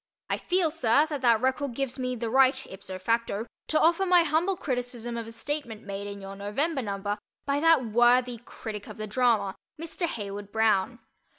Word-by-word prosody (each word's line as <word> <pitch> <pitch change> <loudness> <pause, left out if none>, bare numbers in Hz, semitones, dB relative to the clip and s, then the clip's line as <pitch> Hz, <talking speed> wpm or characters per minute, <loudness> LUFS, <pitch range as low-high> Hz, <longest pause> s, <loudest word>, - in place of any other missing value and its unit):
I - - 0
feel, 355 -3 +1
sir, 290 -2 +3
that 290 -3 -3
that 235 -3 +4
record 260 0 0
gives 270 0 -3
me 255 0 -1
the 230 -1 -3
right 265 +1 +4
ipso 190 -1 -8
facto 225 +2 -1 0.2
to 310 - +2
offer 335 +4 +4
my 360 -2 +5
humble 340 +4 +1
criticism 245 -4 -3
of 230 -1 -4
a - - -8
statement 235 -1 -4
made 200 0 -5
in 200 0 -7
your 195 0 -8
November 265 +10 -1
number 205 -1 -3 0.3
by 280 0 +1
that 325 -4 +4
worthy 240 +2 +3
critic 215 -3 -8
of - - -9
the 215 - -4
drama, 220 -3 +2 0.3
Mr. 330 +2 -3
Heywood 205 -5 -6
Broun. 220 +1 +2
240 Hz, 185 wpm, -27 LUFS, 215-285 Hz, 0.3 s, my